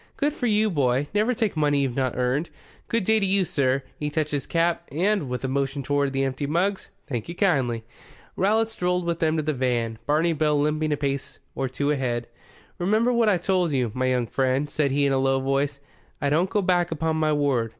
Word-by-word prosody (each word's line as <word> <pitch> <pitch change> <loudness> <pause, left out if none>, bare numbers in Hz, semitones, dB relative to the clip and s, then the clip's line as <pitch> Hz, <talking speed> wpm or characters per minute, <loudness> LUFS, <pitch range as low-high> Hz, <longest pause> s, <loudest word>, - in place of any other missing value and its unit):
"Good 290 0 +1
for 250 -5 -2
you, 215 -1 +2
boy. 135 -3 +1
Never 215 +4 +2
take 220 -5 -1
money 145 -2 +2
you've 130 -3 -1
not 130 -3 -1
earned. 130 +6 0 0.4
Good 230 -2 0
day 220 +3 +3
to 200 - +1
you, 190 0 +2
sir" 135 -3 0 0.2
he 150 - -2
touched 155 0 -1
his 145 -2 -2
cap. 170 0 0
"And" 180 0 0
with 125 +1 -4
a - - 0
motion 140 +1 -1
toward 140 0 0
the 135 0 0
empty 135 +1 -2
mugs 185 +6 0 0.2
"thank 120 -4 -4
you 170 - -5
kindly." 135 - +1 0.5
Rowlatt 220 +4 +2
strolled 180 -5 -1
with 170 -1 -1
them 160 0 +1
to 155 - 0
the 155 +1 0
van, 120 -4 -1
Barney 160 +3 +2
Bill 150 -1 +1
limping 155 +1 0
a 145 - +1
pace 140 -1 -3 0.2
or 135 -1 -2
two 140 +3 -1
ahead. 120 -4 -1 0.5
"Remember 215 +7 +2
what 235 -2 +3
I 195 - +3
told 180 -2 0
you, 125 -4 0
my 130 +1 0
young 125 -2 +1
friend," 130 +3 0
said 145 0 0
he 140 +1 +1
in 140 - +2
a 135 - +2
low 135 0 +2
voice. 135 +1 -1 0.4
"I 140 -1 0
don't 170 +5 +2
go 205 0 0
back 175 -1 +2
upon 160 0 -1
my 155 -1 +2
word. 140 -6 +1
150 Hz, 225 wpm, -25 LUFS, 135-180 Hz, 0.5 s, day